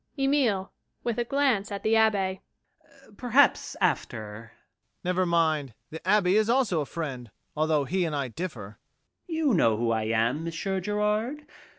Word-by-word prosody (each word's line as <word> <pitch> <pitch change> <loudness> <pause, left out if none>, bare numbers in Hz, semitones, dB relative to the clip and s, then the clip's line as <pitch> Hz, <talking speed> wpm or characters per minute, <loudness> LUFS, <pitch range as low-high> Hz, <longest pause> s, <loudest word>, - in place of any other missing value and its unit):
EMILE. 270 -9 +1 0.3
[With 235 -1 -1
a - - +2
glance 240 -6 +1
at 200 - -5
the 220 - +2
ABBÉ] 200 -4 +2 0.8
Perhaps 250 +3 +3
after 110 -4 0 0.2
MAURICE. - - -22 0.5
Never 180 +1 +1
mind. 155 -7 +1 0.2
The 160 - -6
Abbé 190 0 +2
is 215 +1 +3
also 235 -10 +2
a 145 - -4
friend, 135 -8 -5 0.3
although 155 -2 +1
he 185 +6 0
and 155 -2 -2
I 140 -3 -2
differ. 115 - -7 0.5
EMILE. 325 - -3
You 265 - +3
know 115 - +3
who 115 0 0
I 110 -1 0
am, 115 +7 0
Monsieur 185 +3 -3
Gérard? 210 +8 -1
185 Hz, 160 wpm, -27 LUFS, 145-220 Hz, 0.8 s, Perhaps